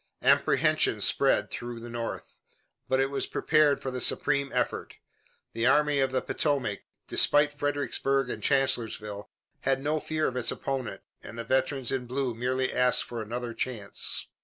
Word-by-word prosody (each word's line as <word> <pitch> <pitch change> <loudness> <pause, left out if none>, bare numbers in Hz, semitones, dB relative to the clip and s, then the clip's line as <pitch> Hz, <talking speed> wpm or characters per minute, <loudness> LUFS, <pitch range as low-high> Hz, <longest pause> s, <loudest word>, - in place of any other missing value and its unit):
Apprehension - - +3
spread - - +3
through 120 -1 -6
the 120 - -9
North, 120 -1 -6 0.5
but 130 - +2
it 135 +1 +1
was 140 - -2
prepared 155 -2 +2
for 130 - -3
the 125 0 -4
supreme 140 -2 +2
effort. - - -2 0.6
The 115 +1 0
Army 150 +1 +3
of 135 -1 +1
the 130 - -1
Potomac, 135 -9 -1 0.3
despite 145 0 +4
Fredericksburg 140 -1 0
and - - -5
Chancellorsville, 110 -7 -1 0.3
had 135 0 0
no 150 +3 -1
fear 155 0 -2
of 125 - -4
its 125 - 0
opponent, 135 -4 -4 0.2
and - - -10
the 115 - -4
veterans 130 +1 0
in 130 -2 -2
blue 130 0 -2
merely 130 +3 -1
asked 125 0 +3
for 120 -2 -6
another 120 +2 -5
chance. 115 -5 -1
130 Hz, 160 wpm, -28 LUFS, 120-140 Hz, 0.6 s, despite